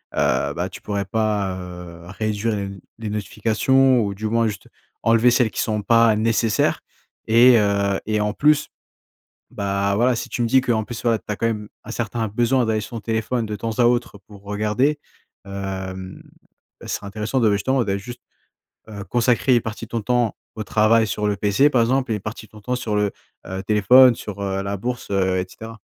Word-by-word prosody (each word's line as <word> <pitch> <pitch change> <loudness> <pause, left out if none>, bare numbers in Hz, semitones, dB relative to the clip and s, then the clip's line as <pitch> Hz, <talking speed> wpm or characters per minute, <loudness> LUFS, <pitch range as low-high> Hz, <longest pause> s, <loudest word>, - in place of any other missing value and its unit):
heu, - - +1
bah, - - -2
tu - - -11
pourrais 100 -1 -2
pas, 105 -2 -1
heu, 90 -1 -10
réduire 110 +2 -2
les 100 - -3
n 100 0 -7 0.2
les 110 -2 -4
notifications, 115 +6 +2
ou 100 -3 -1
du 110 +2 -3
moins 115 +1 +1
juste 105 -4 -6 0.3
enlever 115 +2 +4
celles 120 -2 +2
qui - - -5
sont 105 -1 -1
pas 115 0 +4
nécessaires. 110 0 +1 0.5
Et, 120 +2 +7
heu 100 -1 +1
et 110 0 0
en 105 0 0
plus 150 +4 +2 0.8
bah, 100 0 -1
voilà, 120 +4 +2
si - - -5
tu - - -3
me 120 - +1
dis 130 +3 +4
que, 125 - -1
en 110 -1 +1
plus, 115 +1 -7
voilà, 115 -2 +2
tu - - -35
as 105 - -2
quand 115 - -2
même 105 -2 -2 0.2
un 110 - -8
certain 115 -1 -2
besoin 120 +4 +1
d'aller 110 -1 0
sur 105 - -9
ton - - -7
téléphone 110 +2 -1
de 105 -1 -4
temps 110 +2 -4
à - - +5
autre 120 -3 +1
pour 100 -2 -14
regarder. 105 +8 0 0.5
Hem, 95 -1 -6 0.6
ce - - -10
serait - - -4
intéressant, 105 +5 -2
de 115 - +3
bah, - - +2
justement, 125 +6 +1
d'aller 100 -2 -2
juste, 120 +4 -10 0.7
heu, 100 -2 -7
consacrer 120 +5 +2
une 120 - +3
partie 115 0 -6
de - - -20
ton 115 -1 -2
temps 120 -1 +1 0.2
au 110 - -4
travail 110 +1 +3
sur 105 0 -2
le 105 - 0
PC, 105 +9 +3
par 125 - +3
exemple. 130 +1 +1
Et - - +1
une 105 - -5
partie 105 +2 -7
de 105 - -24
ton 105 - -14
temps 125 +4 -2
sur 115 -4 -3
le, 105 0 +2 0.4
heu, 95 +1 -5
téléphone, 120 +5 +6
sur, 100 -2 -7
heu, 95 0 -2
la 100 +1 -3
bourse, 125 +4 -4
heu, 95 -2 +1
et 90 - -2
cetera. 115 +3 -10
110 Hz, 215 wpm, -22 LUFS, 100-120 Hz, 0.8 s, Et